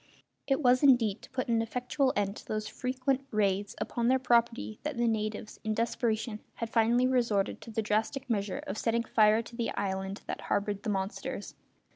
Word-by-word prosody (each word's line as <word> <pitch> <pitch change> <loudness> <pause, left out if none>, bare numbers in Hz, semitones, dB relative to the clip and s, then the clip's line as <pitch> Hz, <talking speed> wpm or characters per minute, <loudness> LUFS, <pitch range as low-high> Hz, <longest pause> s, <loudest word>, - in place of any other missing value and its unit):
It 270 +2 +1
was 250 0 +5
indeed 240 -7 +4
to - - -13
put 260 -1 -3
an 230 -1 +2
effectual 250 +4 0
end 200 0 0
to - - -11
those 215 0 -2
frequent 260 +1 -1
raids 200 -1 0
upon 235 -1 -1
their 260 +1 +5
property 235 -3 +1
that 300 -4 -4
the 240 0 +2
natives, 215 -1 -2
in 215 0 -1
desperation, 225 -1 -1 0.2
had 230 -1 -4
finally 235 +2 +4
resorted 235 -6 +1
to - - -10
the 225 0 -1
drastic 220 +6 -1
measure 205 -4 -1
of 190 - -4
setting 230 0 +1
fire 220 0 +4
to 235 - -12
the 235 -1 -1
island 190 0 -3
that - - -5
harboured 205 0 -1
the 220 - -3
monsters. 195 0 -3
230 Hz, 185 wpm, -30 LUFS, 210-250 Hz, 0.2 s, was